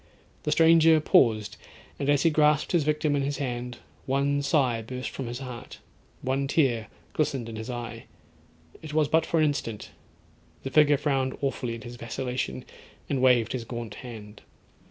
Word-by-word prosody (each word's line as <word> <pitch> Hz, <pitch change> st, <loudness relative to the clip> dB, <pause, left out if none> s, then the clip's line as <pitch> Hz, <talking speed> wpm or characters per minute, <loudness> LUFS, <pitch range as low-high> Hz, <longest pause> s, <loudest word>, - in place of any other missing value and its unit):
The 150 Hz, -, -2 dB
stranger 160 Hz, 0 st, +6 dB
paused, 110 Hz, -8 st, +3 dB, 0.4 s
and 140 Hz, -, -1 dB
as 145 Hz, -1 st, +3 dB
he 165 Hz, -, +4 dB
grasped 150 Hz, -1 st, +3 dB
his 170 Hz, -4 st, +3 dB
victim 150 Hz, 0 st, +1 dB
in 140 Hz, -, +1 dB
his 140 Hz, +1 st, -2 dB
hand, 125 Hz, -2 st, -4 dB, 0.3 s
one 140 Hz, +1 st, +1 dB
sigh 135 Hz, -5 st, +1 dB
burst 125 Hz, +3 st, -6 dB
from 135 Hz, -, -5 dB
his 120 Hz, +1 st, -4 dB
heart—one 130 Hz, +1 st, -6 dB
tear 130 Hz, -7 st, +1 dB, 0.3 s
glistened 135 Hz, -6 st, -1 dB
in 115 Hz, -, -7 dB
his 110 Hz, +3 st, -6 dB
eye. 120 Hz, -1 st, -6 dB, 0.8 s
It 155 Hz, -1 st, -7 dB
was 155 Hz, -2 st, +3 dB
but 160 Hz, +2 st, +2 dB
for 170 Hz, -, 0 dB
an 155 Hz, -, +4 dB
instant; 130 Hz, -7 st, -3 dB, 0.7 s
the 135 Hz, -, -4 dB
figure 150 Hz, -1 st, +5 dB
frowned 135 Hz, -3 st, -1 dB
awfully 130 Hz, -4 st, -2 dB
at 115 Hz, -, -10 dB
his 120 Hz, 0 st, -9 dB
vacillation, 120 Hz, -, -4 dB, 0.5 s
and 135 Hz, -2 st, 0 dB
waved 125 Hz, -3 st, +4 dB
his 125 Hz, -3 st, -3 dB
gaunt 115 Hz, -2 st, -6 dB
hand. 110 Hz, -4 st, -10 dB
135 Hz, 165 wpm, -27 LUFS, 120-150 Hz, 0.8 s, stranger